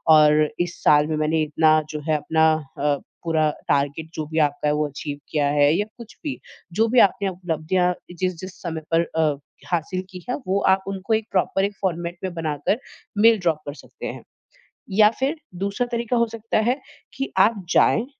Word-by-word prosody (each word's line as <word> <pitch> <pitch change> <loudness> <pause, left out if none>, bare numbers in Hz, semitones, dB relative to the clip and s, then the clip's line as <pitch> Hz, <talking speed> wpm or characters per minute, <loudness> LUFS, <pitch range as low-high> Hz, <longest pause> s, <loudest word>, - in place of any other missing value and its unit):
और 150 0 +5
इस 175 0 -1
साल 150 0 +5
में 155 - -1
मैंने 155 +1 +1
इतना 155 +1 +3
जो 150 - -4
है 155 - +3
अपना 160 +2 +3 0.3
अ, 145 0 +2 0.3
पूरा 160 -2 +2 0.2
टारगेट 145 +3 0
जो 155 - -3
भी 160 0 -1
आपका 145 0 +1
है, 150 - +3
वो 150 0 0
अचीव 145 0 -6
किया 145 -2 +1
है 145 0 +6
या 205 - 0
कुछ 235 -3 -12
भी, 285 -3 -4 0.3
जो 225 +5 +3
भी 245 +2 +4
आपने 195 0 -3
उपलब्धियाँ 180 0 0 0.3
जिस-जिस 185 0 -4
समय 165 -2 -4
पर 165 - +5 0.2
अ, 155 -2 +3 0.4
हासिल 180 +2 -1
की 180 -2 -9
है, - - +1
वो 195 +2 +2 0.2
आप 190 - -12
उनको 195 +3 -2
एक 220 0 0
प्रॉपर 195 0 +1
एक 205 - -4
फ़ॉर्मेट 175 -2 -2
में 185 -2 -3
बनाकर 160 - -1 0.4
मेल 225 0 +6
ड्रॉप 165 -4 +1
कर 145 - -4
सकते - - -10
हैं। - - -7 0.7
या 210 +2 +6
फ़िर 270 +4 +1 0.2
दूसरा 200 +6 -1
तरीका 235 +1 0
हो 235 - +4
सकता 230 0 -3
है 245 +6 +1 0.4
कि 270 +1 -3
आप 205 0 +3
जाएँ 225 - +4
175 Hz, 190 wpm, -23 LUFS, 155-205 Hz, 0.7 s, है